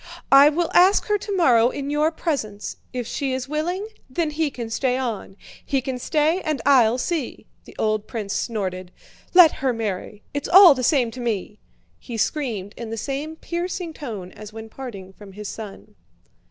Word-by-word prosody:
I 275 +2 +9
will 330 +2 -1
ask 370 +3 +5
her 415 0 +2
tomorrow 265 - +3
in 280 +2 -4
your 300 +1 +2
presence; 230 - -3
if 250 -1 -4
she 270 +3 -2
is 260 0 -3
willing, 340 +7 -2 0.2
then 315 +3 -1
he 310 0 0
can 235 -4 -7
stay 255 +2 0
on. 225 -6 -4 0.3
He 275 - 0
can 260 0 -4
stay 310 +7 +1
and 305 -2 -2
I'll 250 -4 +5
see." 305 0 -3 0.2
The - - -14
old 215 -1 0
prince 210 -4 -4
snorted. 185 -5 -3 0.4
"Let 350 -4 +9
her 265 -2 +1
marry, 210 -2 -4
it's 285 0 -3
all 365 -2 +9
the 255 - -4
same 245 -3 +2
to 255 - -9
me!" 215 -3 -3 0.4
he 235 -3 -7
screamed 220 -6 -2
in 235 -2 -6
the 225 - -4
same 280 +7 -4
piercing 345 0 -4
tone 215 -12 -7
as 210 0 -11
when 220 0 -9
parting 200 -8 -9
from 200 -1 -13
his 210 +1 -7
son. 210 -1 -9
255 Hz, 180 wpm, -23 LUFS, 220-305 Hz, 0.4 s, I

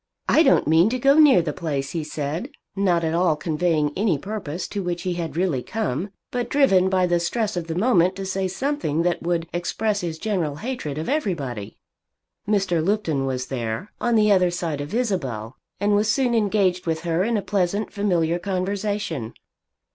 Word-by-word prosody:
"I 315 - +5
don't 325 - +4
mean 165 +6 +5
to 255 - -1
go 275 +4 +4
near 275 - +7
the 150 -3 -3
place," 140 -5 -3
he 165 -2 -2
said, 150 - -4 0.3
not 180 -4 +2
at 160 0 0
all 170 -2 +3
conveying 155 -1 0
any 195 -6 +1
purpose 185 -2 -5
to 205 - -3
which 175 -1 -3
he 180 - -1
had 165 -2 -4
really 170 -8 +1
come, 200 - -3 0.2
but 245 -1 -2
driven 195 -10 +4
by 185 -1 +2
the 175 -1 +2
stress 210 +5 -1
of 170 -2 -3
the 165 - -3
moment 185 -3 +3
to 195 - -5
say 190 0 -1
something 190 - -1
that 175 0 +1
should 170 -1 -1
express 200 +4 -1
his 165 -2 -4
general 170 -7 -1
hatred 155 - -4
of 155 - -4
everybody. 145 - -2 0.7
Mr. 195 -6 +1
Lupton 165 -8 0
was 130 -1 -2
there, 120 - -4
on 240 -1 +2
the 210 -1 +4
other 185 -2 +4
side 170 -4 -3
of 145 - -6
Isabel, 135 - -2 0.2
and 205 0 +2
was 210 +1 +2
soon 255 -2 +1
engaged 200 -5 +1
with 160 -1 -1
her 170 +1 0
in 230 +2 +1
a 200 - -2
pleasant 200 +1 -1
familiar 175 -5 +1
conversation. 195 - -2
180 Hz, 185 wpm, -23 LUFS, 160-210 Hz, 0.7 s, near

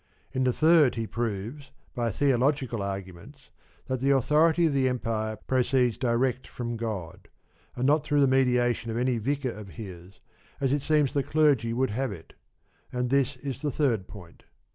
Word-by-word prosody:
In 130 0 0
the 125 - +3
third, 155 -1 +4
he 115 -1 -2
proves, 115 +5 -4 0.2
by 120 -3 -1
theological 130 -1 +1
arguments, 100 - -7 0.3
that 130 -1 -2
the 135 +2 +1
authority 150 +5 +3
of 155 - +1
the 130 -2 +2
Empire 110 -3 -2
proceeds 125 +1 +1
direct 125 +1 0
from 120 -1 -5
God, 110 -8 -5 0.5
and 125 - -1
not 145 +2 +3
through 145 -1 +2
the - - +6
mediation 125 -3 +2
of 115 - -3
any 125 -1 +1
vicar 135 +2 -1
of 105 -2 -9
his, 95 -4 -10 0.4
as 135 -1 +1
it 145 - 0
seems 150 -2 +2
the 140 - +2
clergy 140 -6 +2
would 125 0 0
have 130 +2 -2
it; 85 -5 -11 0.6
and 125 0 -2
this 140 0 +2
is 135 0 -6
the 150 - -1
third 120 -9 0
point. 95 -6 -13
125 Hz, 170 wpm, -27 LUFS, 115-140 Hz, 0.6 s, the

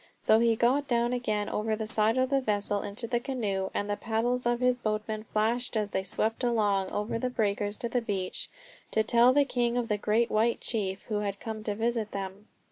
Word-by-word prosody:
So 220 - +4
he 230 -1 +3
got 260 +5 +2
down 240 0 +1
again 215 -4 -1
over 215 +1 -1
the 220 0 -4
side 220 +1 +1
of 260 +1 +1
the 275 -1 +3
vessel 205 -3 0
into 205 +4 -2
the 240 +1 0
canoe, 210 -7 -2
and 205 - -2
the 205 - 0
paddles 240 +3 -1
of 240 0 +1
his 250 0 +3
boatman 215 -1 -2
flashed 230 +3 +1
as 210 -1 -1
they 190 - 0
swept 220 +5 -1
along 205 -5 +1
over 210 +2 -2
the 255 - -1
breakers 205 -3 -1
to 235 - -3
the 245 +1 0
beach 195 -5 -3 0.4
to 220 - +2
tell 235 +2 +5
the 285 +2 +4
king 245 -2 0
of 240 -2 -1
the 210 -1 0
great 220 +3 +1
white 225 +2 +2
chief 195 -4 -2
who 210 -2 -2
had 200 -1 -3
come 220 -1 -6
to 210 - -1
visit 225 -1 -1
them. 195 +2 -6
220 Hz, 215 wpm, -29 LUFS, 210-240 Hz, 0.4 s, tell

